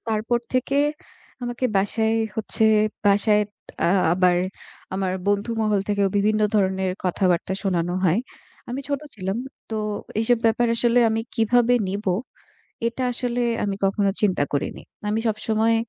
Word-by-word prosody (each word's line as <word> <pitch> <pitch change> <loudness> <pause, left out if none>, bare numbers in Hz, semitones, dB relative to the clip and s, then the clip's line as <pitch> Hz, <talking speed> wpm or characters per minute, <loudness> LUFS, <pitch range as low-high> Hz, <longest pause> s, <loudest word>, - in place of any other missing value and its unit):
তারপর 225 +2 +1 0.2
থেকে 265 +2 +1 0.6
আমাকে 240 +1 -3
বাসায় 220 +3 +1 0.2
হচ্ছে, 220 0 0 0.4
বাসায় 210 +1 +4 0.4
আ - - +4 0.3
আবার 180 -1 +3 0.6
আমার 190 -1 -1
বন্ধুমহল 210 0 +1
থেকেও 205 -1 +2
বিভিন্ন 215 +2 +2
ধরনের 190 -2 +1
কথাবার্তা 180 0 +1
শোনানো 175 -2 0
হয়। 180 +5 +3 0.5
আমি 260 +3 -3
ছোট 285 -1 -1
ছিলাম। 190 +1 -3 0.3
তো 220 - -2 0.4
এসব 235 +1 +3
ব্যাপার 230 +2 +3
আসলে 240 +1 +3
আমি 220 0 0
কিভাবে 240 +1 +3
নিবো? 195 -1 -1 0.7
এটা 235 +2 -2
আসলে 245 0 -2 0.2
আমি 200 -1 -1
কখনো 195 +1 +2
চিন্তা 190 -8 +2
করিনি। 145 +1 -2 0.3
আমি 215 +2 0
সবসময় 220 +1 +1
210 Hz, 130 wpm, -23 LUFS, 195-230 Hz, 0.7 s, বাসায়